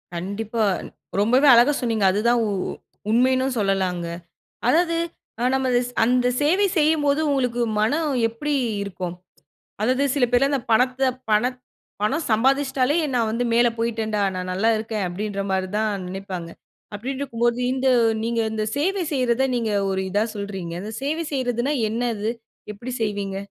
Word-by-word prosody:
கண்டிப்பா. 210 +5 -2 0.6
ரொம்பவே 250 +8 +4
அழகா 240 +5 +6
சொன்னீங்க. 225 -4 +1
அதுதான் 235 +4 +2
உ - - -1 0.6
உண்மையின்னு 260 +2 +2
சொல்லலாங்க. 190 -3 0 0.6
அதாவது, 335 +4 +3 0.4
அ - - -1
நம்ம 265 -1 +1
அது 245 - +4 0.2
அந்த 250 +1 +2 0.2
சேவை 370 +8 +3
செய்யும்போது, 295 -1 +3
உங்களுக்கு 250 -3 0 0.2
மனம் 295 +6 +1 0.2
எப்பிடி 290 +6 -3 0.3
இருக்கும்? 185 -3 -5 0.7
அதாவது 255 +5 +2
சில 270 -4 +3
பேர்லாம், 275 +3 +3
அந்த 270 -4 0
பணத்த 255 +3 +3 0.2
பணத் 245 +4 +2 0.4
பணம் 290 +9 0
சம்பாதிச்சுட்டாலே, 265 +4 +2 0.2
நான் 230 -2 +2
வந்து 235 +2 -1
மேல 240 +1 +5
போயிட்டன்டா! 220 -2 -1
நான் 185 0 -4
நல்லா 200 +5 +1
இருக்கேன். 215 -2 -3
அப்பிடின்ற 200 +2 -3
மாரி 190 -1 0
தான் 215 -1 +1 0.2
நினைப்பாங்க. 185 -2 -6 0.5
அப்பிடின்ருக்கும்போது, 240 0 -1
இந்த 265 0 0 0.4
நீங்க 230 0 0
இந்த 215 -1 -1
சேவை 370 +5 0
செய்யிறத, 255 -2 +1
நீங்க 225 -3 -1 0.2
ஒரு 190 0 -1
இதா 205 +3 +1
சொல்றீங்க. 195 -4 -5
அந்த 215 +2 -6
சேவை 315 +4 -1
செய்யிறதுன்னா 255 +1 0 0.2
என்ன 235 +2 -2
அது? 210 +2 -1 0.4
எப்பிடி 235 +5 -7
செய்வீங்க? 200 -2 -2
235 Hz, 140 wpm, -23 LUFS, 210-265 Hz, 0.7 s, அழகா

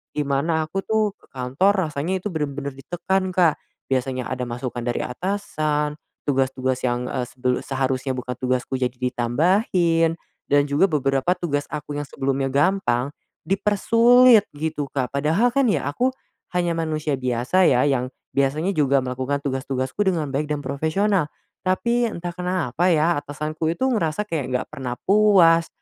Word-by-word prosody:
dimana 150 +3 0
aku 155 +5 -3
tuh 215 +1 +1
ke - - -24
kantor 135 +11 +2 0.2
rasanya 175 +6 -2
itu 210 - -3
bener-bener 145 -3 -3
ditekan, 180 +7 -2
Kak. 170 -4 +3 0.3
Biasanya 130 -1 -1
ada 125 -1 -3
masukan 120 0 -4
dari 120 0 -2
atasan, 150 -2 -2 0.2
tugas-tugas 130 -2 0
yang, 125 +1 -2
eee, 125 -2 -2
sebel 125 0 -1
seharusnya 130 0 -2
bukan 125 0 -5
tugasku 130 0 -1
jadi 125 -1 -1
ditambahin, 165 - +1 0.3
dan 145 0 +4
juga 145 +6 +2
beberapa 140 +1 +1
tugas 145 -5 -2
aku 150 -1 -5
yang 145 - -5
sebelumnya 135 0 -1
gampang, 140 -3 +1 0.3
dipersulit 230 +4 +5
gitu, 150 -1 -3
Kak. 130 -2 -3
Padahal 160 - +2
kan 275 0 +2
ya 210 - +1
aku 255 - 0 0.4
hanya 175 -1 +1
manusia 155 -3 -1
biasa 125 +9 +2
ya, 125 -1 +4
yang 135 -3 +1 0.2
biasanya 145 +7 +1
juga 140 -6 +2
melakukan 130 +3 -2
tugas-tugasku 130 0 -3
dengan 160 -6 0
baik 145 +2 -1
dan 150 -1 -3
profesional. 160 +6 0 0.3
Tapi 235 +6 +1
entah 175 -5 -5
kenapa 180 -3 -1
ya 165 -2 +3
atasanku 150 +2 -4
itu 170 +10 -1
ngerasa 210 -8 +1
kayak 165 -10 -3
nggak 125 0 -2
pernah 130 -5 -4
puas 190 -5 +5
150 Hz, 145 wpm, -23 LUFS, 130-180 Hz, 0.4 s, dipersulit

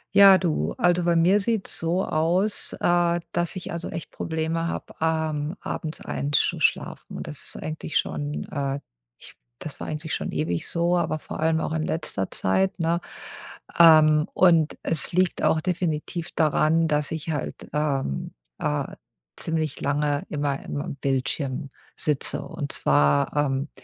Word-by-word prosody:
Ja, 195 -1 +9
du, 175 -4 -1
also, 175 0 +3
bei 170 0 +2
mir 180 +5 +4
sieht's 215 0 -1
so 170 +3 0
aus, 175 +7 0
äh, 175 0 +2
dass 175 +1 0
ich, 185 - -6
also, 170 0 -4
echt 165 - -6
Probleme 160 +1 -2
habe, - - -5
ähm, 160 0 0
abends 155 -2 -5
einsch 145 +1 0
schlafen. - - -1
Und - - -6
das - - -6
ist - - -5
eigentlich 155 -1 -3
schon, 145 0 -2
äh 140 -2 -2 0.4
ich - - -14 0.3
das - - -8
war - - -5
eigentlich 155 +1 -4
schon - - -4
ewig 80 +2 -2
so, 170 +1 +1
aber 170 -2 0
vor - - -8
allem 160 0 +2
auch 155 - -2
in 160 -1 -1
letzter 155 - -1
Zeit, 190 - +1
ne? 170 +1 +1 0.8
Ähm, 155 -2 +7
und 165 -4 +4
es 165 - 0
liegt 185 0 +1
auch 160 - +3
definitiv 170 -1 -2
daran, 160 +1 +3
dass 150 -2 0
ich 160 0 -3
halt, 145 - -4
ähm, 140 - -1 0.3
äh, 75 - -2 0.4
ziemlich 160 -3 -2
lange 145 0 0
immer 145 -2 -2
im 145 - -4
am 165 -1 -5
Bildschirm 135 0 -1 0.3
sitze. 150 -3 +1
Und - - -5
zwar, 70 - +2
ähm, 140 0 0
160 Hz, 155 wpm, -25 LUFS, 145-170 Hz, 0.8 s, Ja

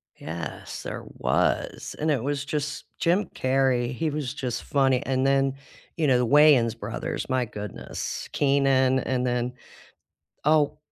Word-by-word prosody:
Yes, 80 +1 -6
there - - -5 0.2
was, - - 0
and 155 +1 0
it 130 -5 +1
was 145 0 -1
just 145 0 -3
Jim 180 +5 +2
Carrey, 130 -1 +1
he 155 +6 -1
was 145 -3 -3
just 130 -5 -3
funny 135 -1 +2
and 130 0 +1
then, 135 -1 +2 0.4
you 160 -3 +1
know, 130 -2 +5
the 125 - +2
Wayans 140 -4 +6
brothers, 110 +4 -4
my 130 -1 +1
goodness. 105 -1 -6
Keenan 135 -2 +3
and 125 -1 -1
then, 125 0 -1 0.9
oh, 150 -1 +3
135 Hz, 145 wpm, -26 LUFS, 125-145 Hz, 0.9 s, Wayans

